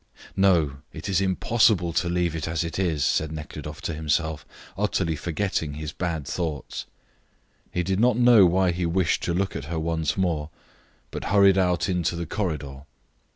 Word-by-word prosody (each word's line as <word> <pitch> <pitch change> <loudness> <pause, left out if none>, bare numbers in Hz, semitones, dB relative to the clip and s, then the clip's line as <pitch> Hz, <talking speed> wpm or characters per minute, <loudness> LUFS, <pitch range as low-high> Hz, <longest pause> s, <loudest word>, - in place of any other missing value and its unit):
"No; 85 -8 +3
it 80 - -7
is 95 -1 +1
impossible 95 -2 +2
to 85 +1 0
leave 85 -2 0
it 80 -1 -3
as 80 +1 -1
it 85 +2 -4
is," 80 -7 +1
said 80 +2 +1
Nekhludoff 75 -1 -7
to 85 - -2
himself, 80 0 -1 0.3
utterly 95 -5 0
forgetting 80 -3 -2
his 75 0 -5
bad 80 -3 -3
thoughts. 75 -1 -4 0.8
He 90 - -1
did 95 +2 -1
not 120 0 +3
know 120 -6 +7
why 90 +1 +2
he 90 +1 -3
wished 85 -1 +1
to 85 - 0
look 95 +2 -1
at 70 - -4
her 80 +2 -4
once 80 -1 -1
more, 80 -5 0 0.6
but - - -5
hurried 100 -1 +5
out 90 -4 +1
into 90 -2 0
the 85 0 -3
corridor. 75 -8 -4
85 Hz, 170 wpm, -25 LUFS, 80-95 Hz, 0.8 s, know